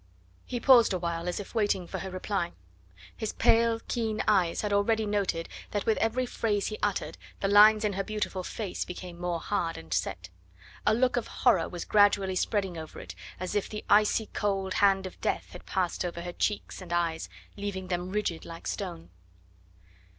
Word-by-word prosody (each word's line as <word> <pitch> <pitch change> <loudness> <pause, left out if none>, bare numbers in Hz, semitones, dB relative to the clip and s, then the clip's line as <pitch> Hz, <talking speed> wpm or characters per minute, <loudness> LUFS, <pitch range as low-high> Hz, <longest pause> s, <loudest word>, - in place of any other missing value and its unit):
He 245 - -3
paused 240 -4 +6
a - - +1
while 170 0 -3
as 175 - -3
if 205 - -8
waiting 205 -5 +1
for - - -5
her 190 - -5
reply. 185 -1 -2 0.6
His 220 - -3
pale, 230 0 +3
keen 225 -3 -1
eyes 185 -5 +3
had 210 -1 -1
already 220 +2 +2
noted 200 -5 -1 0.2
that 205 -2 -2
with 220 - +2
every 230 +3 +1
phrase 210 -4 -1
he 215 - -6
uttered 205 -2 -1 0.2
the 195 - 0
lines 210 +2 +7
in 205 - +1
her 195 +1 -1
beautiful 210 -2 -3
face 195 +1 -4
became 180 -1 -8
more 175 -1 -1
hard 170 -3 -1
and 80 0 -6
set. 90 +2 -2 0.6
A 215 - +5
look 250 +1 +2
of 240 - -1
horror 195 -10 +2
was 175 - -5
gradually 205 -2 +4
spreading 190 -3 0
over 160 -1 -9
it, - - -8 0.3
as 185 0 -3
if 205 - 0
the 210 - -6
icy 210 +1 +4
cold 195 -2 -1
hand 195 -1 +3
of 185 - -9
death - - -1
had - - -11
passed 185 -1 -1
over 170 -1 -4
her 175 - -5
eyes 205 +3 -2
and 180 - -9
cheeks, 170 -1 0 0.3
leaving 200 -3 -4
them 180 0 -2
rigid 195 -4 -2
like 165 0 -9
stone. 85 +1 -5
195 Hz, 185 wpm, -29 LUFS, 175-215 Hz, 0.6 s, lines